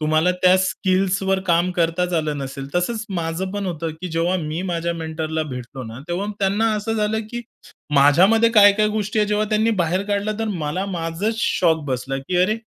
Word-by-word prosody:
तुम्हाला 155 +3 +2
त्या 185 +1 +6
स्किल्सवर 190 0 +1
काम 175 +1 +2
करताच 175 +1 0
आलं 155 -3 -1
नसेल. 135 0 -6
तसंच 215 +5 -1
माझं 170 +2 -2
पण 205 -1 -3
होतं, 165 -2 -3
की 180 - -4
जेव्हा 170 +3 +1
मी 155 0 -3
माझ्या 170 -2 -2
मेंटरला 160 -1 -3
भेटलो 125 +1 -7
ना, 115 +2 -8
तेव्हा 180 +4 -2
त्यांना 205 +3 +1
असं 210 +2 -3
झालं, 215 0 0
की 240 - -4 0.5
माझ्यामध्ये 185 +12 +5
काय-काय 210 -1 +6
गोष्टी 210 0 -2
आहे, 210 - +2
जेव्हा 210 0 +1
त्यांनी 215 +1 +2
बाहेर 175 +3 0
काढलं, 205 +1 -1
तर 225 - -1 0.2
मला 180 +7 -2
माझंच 180 +4 -2
शॉक 160 -7 +1
बसला, 130 +1 -2
की 180 +7 -3
"अरे, 215 +4 +1
180 Hz, 180 wpm, -21 LUFS, 160-205 Hz, 0.5 s, त्या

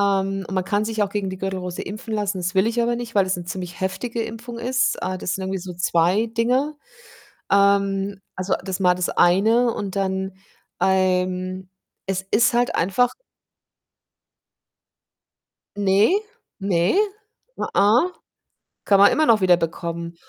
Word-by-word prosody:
Ähm, 195 -1 0
man 185 -1 -1
kann 205 +2 0
sich 220 -1 -1
auch 200 - -1
gegen 200 -2 -2
die 185 - -7
Gürtelrose 185 -2 -4
impfen 215 +2 -6
lassen. 205 -2 -1
Das 180 0 -3
will 190 +2 +3
ich 235 +1 0
aber 235 0 +1
nicht, 235 -2 -7
weil 195 -2 +3
es 185 - 0
'ne 175 - -7
ziemlich 180 0 -6
heftige 230 +5 -2
Impfung 230 +1 -7
ist. 255 +2 +1
Äh, 185 0 -2
das 180 - -2
sind 195 - -4
irgendwie 190 0 -2
so 180 0 -7
2 180 +5 +2
Dinger. 250 +6 0 0.8
Ähm, 200 0 +2 0.2
also, 185 0 -1
das 190 -2 -3
ist - - -16
mal 180 -1 +4
das 180 0 -2
eine, 225 +7 +3
und 200 -1 -5
dann 190 -1 -1 0.5
ähm, 185 0 0 0.4
es 190 -1 -2
ist 235 +2 +3
halt 245 0 +1
einfach 205 +8 +2 2.7
Ne, 205 - +3 0.4
ne, 190 - +1 0.6
a - - -2
a 230 - +4 0.7
kann 200 - +5
man 200 - +7
immer 310 - +2
noch 225 -3 +4
wiederbekommen. 170 -1 0
195 Hz, 155 wpm, -22 LUFS, 185-225 Hz, 2.7 s, man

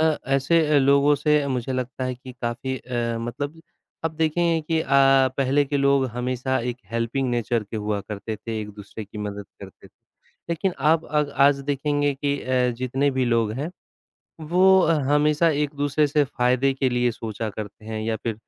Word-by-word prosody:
अ, 160 -1 +3 0.2
ऐसे 150 +2 +3
लोगों 140 +2 +4
से 150 0 +2
मुझे 130 -1 -2
लगता 130 0 -3
है 130 0 -2
कि 130 +1 -11
काफ़ी 120 +3 -2
अ, 120 -2 -3
मतलब 145 +7 -5 0.4
अब 165 - +1
देखेंगे 165 +1 +1
कि 160 +1 -1
अ, - - -4 0.5
पहले 140 +1 +2
के 140 +1 -2
लोग 140 -1 +3
हमेशा 125 +2 -2
एक 120 0 -3
हेल्पिंग 115 +3 -1
नेचर 120 -1 0
के 105 - -7
हुआ 105 -1 -2
करते 105 +2 -6
थे, 110 +1 -5
एक-दूसरे 105 +1 -8
की 105 +1 -11
मदद 100 -1 -5
करते 95 -1 -12
थे, - - -37 0.6
लेकिन 170 +3 -1
आप 155 +3 +3
अग 150 -1 0 0.2
आज 140 -1 +2
देखेंगे 145 +1 0
कि 140 +1 -1
अ, 125 -1 +1
जितने 130 +3 0
भी 130 -1 0
लोग 115 -3 +1
हैं, 140 +8 -4 0.7
वो 185 +4 +4
अ, 165 - +3 0.2
हमेशा 150 +2 +3
एक-दूसरे 145 0 0
से 145 0 +2
फ़ायदे 130 +1 +1
के 135 -1 +1
लिए 125 0 +1
सोचा 110 -1 -5
करते 105 +1 -8
हैं 110 0 -4
या 110 0 -1
फिर 115 - -1
130 Hz, 180 wpm, -24 LUFS, 115-145 Hz, 0.7 s, लोगों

